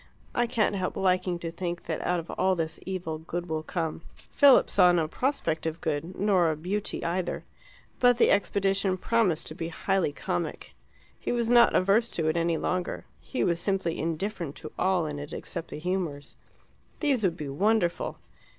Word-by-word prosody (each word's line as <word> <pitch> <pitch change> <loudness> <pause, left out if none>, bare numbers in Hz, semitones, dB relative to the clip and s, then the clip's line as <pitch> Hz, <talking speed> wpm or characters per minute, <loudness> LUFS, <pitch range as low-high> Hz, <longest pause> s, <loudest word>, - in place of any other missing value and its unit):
I 240 0 +1
can't 225 -4 +1
help 185 -2 -2
liking 180 -1 +1
to 170 -1 -5
think 175 0 -4
that 160 - -3
out 180 0 +1
of 165 - -7
all 190 0 +2
this 160 -2 -3
evil 175 -5 -3
good 175 +2 -5
will 160 -1 -2
come." 160 0 -3 0.3
Philip 280 -2 +6
saw 180 -2 +5
no 165 -3 +2
prospect 170 - -1
of 160 +1 -3
good, 160 +4 -3
nor 190 -4 +3
of 155 0 -4
beauty 205 +3 -2
either. 175 +1 -2 0.6
But 245 -1 +5
the - - +5
expedition 195 -1 +1
promised 200 -6 +1
to - - -5
be 165 0 -4
highly 185 0 0
comic. 90 -10 -4 0.5
He - - -3
was 240 -1 0
not 240 -1 +6
averse 205 +5 +3
to 165 - 0
it 155 - 0
any 170 -1 +1
longer; 180 +2 -2
he 265 - -3
was 170 -1 +1
simply 190 -3 -1
indifferent 165 -1 -3
to 155 - -9
all 185 -3 +2
in 150 -1 -4
it 145 0 -7
except 165 - -6
the - - -7
humours. 165 -4 -3 0.6
These 275 -7 +1
would 175 -3 +1
be 150 -2 -5
wonderful. 190 +4 +1
180 Hz, 180 wpm, -28 LUFS, 165-195 Hz, 0.6 s, Philip